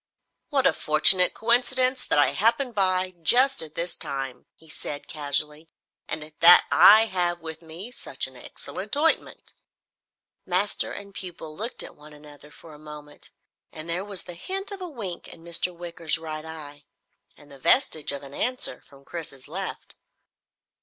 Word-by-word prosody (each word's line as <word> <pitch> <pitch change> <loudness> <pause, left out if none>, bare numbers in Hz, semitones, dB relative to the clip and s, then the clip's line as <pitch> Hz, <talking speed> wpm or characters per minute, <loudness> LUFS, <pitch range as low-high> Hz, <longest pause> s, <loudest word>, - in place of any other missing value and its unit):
"What 275 -3 +1
a - - +5
fortunate 170 +4 +5
coincidence 255 +2 +2
that - - +2
I 145 - +5
happened 235 +4 +1
by 185 -2 +1
just 255 - +5
at 155 -1 -8
this 170 +1 -2
time," 135 -2 -5
he 160 - -21
said 145 -1 -7
casually, 150 +1 -2 0.4
"and 155 0 -6
that 175 +2 +9
I 215 +2 +8
have 175 -4 -1
with 160 0 -7
me 170 +8 -9
such - - -2
an - - -11
excellent - - -5
ointment." 325 +2 0 0.9
Master 185 +3 -1
and 200 0 -8
pupil 170 -5 -8
looked 225 +7 -2
at - - -9
one 150 0 -15
another 150 0 -14
for 160 +1 -14
a 150 - -14
moment, 150 -1 -12 0.4
and 155 +1 -8
there 170 +3 -1
was 200 -2 -3
the 175 - -9
hint 385 - -4
of 395 -1 -6
a 360 - -5
wink 205 - -6
in 165 - -12
Mr. 170 +1 0
Wicker's 170 -2 -3
right 155 -1 -7
eye, 145 -2 -10 0.5
and 145 -1 -18
the 140 - -13
vestige 160 - +2
of 140 0 -6
an 140 0 -11
answer 255 - -1
from 140 0 -20
Chris's 150 -6 -7
left. 185 +5 -5
170 Hz, 165 wpm, -25 LUFS, 150-205 Hz, 0.9 s, that